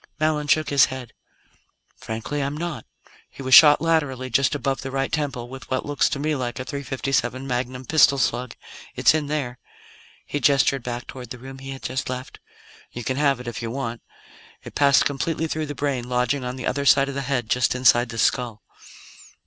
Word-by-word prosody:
Mallon 155 -1 0
shook 155 +1 +2
his 140 -1 +6
head. 130 -3 -8 0.8
"Frankly, 115 +6 -4
I'm 140 +2 -2
not. 165 -7 -5 0.4
He 135 - -10
was 130 0 0
shot 150 +1 +9
laterally, 140 -6 0
just 135 +4 +2
above 135 -1 -2
the 135 - -5
right 135 0 -2
temple, 140 -6 -2
with 130 +1 -10
what 130 - -1
looks 145 -1 +1
to - - -2
me 155 +2 -1
like 125 -3 -4
a 130 - -4
.357 135 -2 -2
magnum 125 0 -3
pistol 140 0 +5
slug. 125 -1 -1 0.4
It's - - +5
in 155 -2 -1
there 135 -5 -3 0.3
" - - -26
He 145 - -3
gestured 140 0 +3
back 120 +1 -5
toward 125 -3 -9
the 125 - -7
room 135 +2 -10
he 135 0 -9
had 135 -1 -8
just 130 0 -3
left. 130 0 -6 0.3
" - - -24
you 120 - -7
can 130 +3 -2
have 140 -3 +2
it, 125 - -9
if 120 -1 -5
you 115 - -4
want. 120 -2 -4 0.6
It - - -10
passed 140 -1 +4
completely 155 +3 -1
through 155 -1 -3
the 145 - -6
brain, 135 -4 -2
lodging 125 +2 0
on 125 0 -4
the 130 - -6
other 140 +1 -1
side 135 +1 +5
of 140 - -4
the 140 - -3
head, 125 -4 -2
just 125 +1 +1
inside 125 -1 +4
the 115 - -7
skull. 115 0 0
135 Hz, 205 wpm, -23 LUFS, 125-145 Hz, 0.8 s, shot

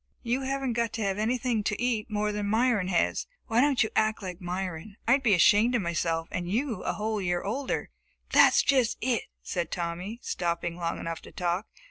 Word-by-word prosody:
"You 245 +2 0
haven't 270 -1 -1
got 235 -1 -1
to 225 - -2
have 195 0 -1
anything 235 0 0
to 210 - -1
eat 235 -3 0
any - - -9
more 210 0 +1
than 205 -1 -2
Myron 220 -3 +2
has. 180 -3 +1 0.2
Why 230 0 +2
don't 275 -3 +4
you 220 - -3
act 215 -1 +1
like 180 0 -6
Myron? 180 +2 -4
I'd 265 +4 +5
be 225 -7 +4
ashamed 210 +8 +5
of 230 - +1
myself, 165 -1 -1
and 175 -1 -3
you 230 +1 -1
a - - -1
whole 215 0 -2
year 175 -1 0
older!" 255 +7 -2 0.4
"That's - - +6
just 255 -5 +2
it!" 245 -2 0 0.2
said 175 -3 -2
Tommy, 180 +6 -4
stopping 170 -1 -2
long 170 -1 -2
enough 165 0 -5
to - - -13
talk. 180 +3 -1
210 Hz, 200 wpm, -28 LUFS, 175-235 Hz, 0.4 s, That's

